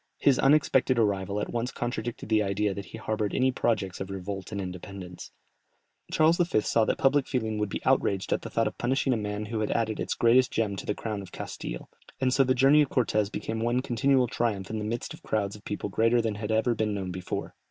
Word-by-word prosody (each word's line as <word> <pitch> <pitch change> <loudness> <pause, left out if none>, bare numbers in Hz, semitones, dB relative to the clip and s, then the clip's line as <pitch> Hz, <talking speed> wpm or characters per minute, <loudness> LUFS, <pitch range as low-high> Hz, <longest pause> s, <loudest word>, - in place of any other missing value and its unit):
His 135 -3 +3
unexpected 135 -2 +3
arrival 100 -2 +1
at - - -3
once 120 +1 -2
contradicted 120 -1 -4
the 110 -1 +3
idea 100 0 0
that 100 0 -6
he 105 - -9
harboured 110 -1 -2
any 130 0 +3
projects 100 -7 -1
of 95 - -4
revolt 95 +1 -5
and 100 - -3
independence. 90 -1 -7 0.8
Charles 160 +2 +4
V. 170 -11 +2
saw 110 +1 +2
that - - 0
public 135 0 +3
feeling 110 -5 -1
would 105 -1 -1
be - - -5
outraged 95 -1 +2
at - - -1
the - - -7
thought - - +1
of - - -4
punishing 130 +2 +1
a - - +2
man 105 -1 -3
who 110 +1 -3
had 110 - -1
added 110 -2 0
its - - -2
greatest 120 +2 +4
gem 105 -3 -1
to - - -7
the 105 - 0
crown 105 -3 -4
of 95 - -11
Castille, - - -6 0.3
and 130 -1 +2
so 135 - +5
the 130 0 +2
journey 135 +4 +6
of 145 - +1
Cortès 105 -4 +1
became 110 0 -3
one 120 +3 +1
continual 130 +1 +2
triumph 110 -5 -2
in 110 - -2
the 105 - -3
midst 115 +2 -3
of - - -13
crowds 100 -2 -1
of 105 - -14
people 105 - -3
greater 115 +4 +2
than 115 -2 0
had 105 +1 -5
been 110 - +2
ever 120 +1 +1
known 100 -3 -2
before. 90 0 -5
110 Hz, 230 wpm, -28 LUFS, 100-125 Hz, 0.8 s, journey